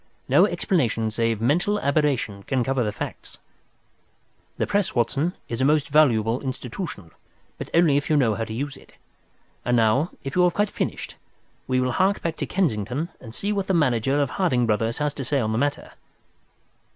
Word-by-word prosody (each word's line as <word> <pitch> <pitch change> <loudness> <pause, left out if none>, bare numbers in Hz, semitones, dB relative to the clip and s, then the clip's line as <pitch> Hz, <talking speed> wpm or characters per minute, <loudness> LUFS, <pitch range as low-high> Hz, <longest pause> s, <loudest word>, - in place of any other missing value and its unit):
No - - +5
explanation 115 - 0
save 115 -1 0
mental 175 - +1
aberration 140 - 0
can 130 +4 -1
cover 130 0 0
the 105 - -1
facts. - - -7 1.2
"The - - 0
Press, 200 -2 0
Watson, 140 +8 0
is 115 +2 -3
a - - +3
most 145 0 +2
valuable 120 -6 +3
institution, 130 - -6 0.5
if - - -6
you 165 - +4
only 145 -5 +4
know 125 -7 +3
how 115 +2 -3
to 110 - -7
use 140 +4 -4
it. - - -19 0.7
And 125 0 +2
now, 115 +9 +3
if 135 - -5
you 180 - +4
have 175 - +1
quite 205 0 +1
finished, - - -4 0.5
we 130 0 +1
will 130 0 +1
hark 190 +9 +1
back 165 -1 -1
to - - -3
Kensington 140 - -1
and 115 -2 -10
see 205 +1 -1
what 195 -2 -2
the 190 - +1
manager 135 -2 +2
of 140 -3 0
Harding 140 -11 +1
Brothers 115 +1 0
has 150 -1 -1
to 140 - -5
say 140 +2 0
on 110 -3 0
the 110 - 0
matter." 145 +1 -2
135 Hz, 185 wpm, -24 LUFS, 115-155 Hz, 1.2 s, No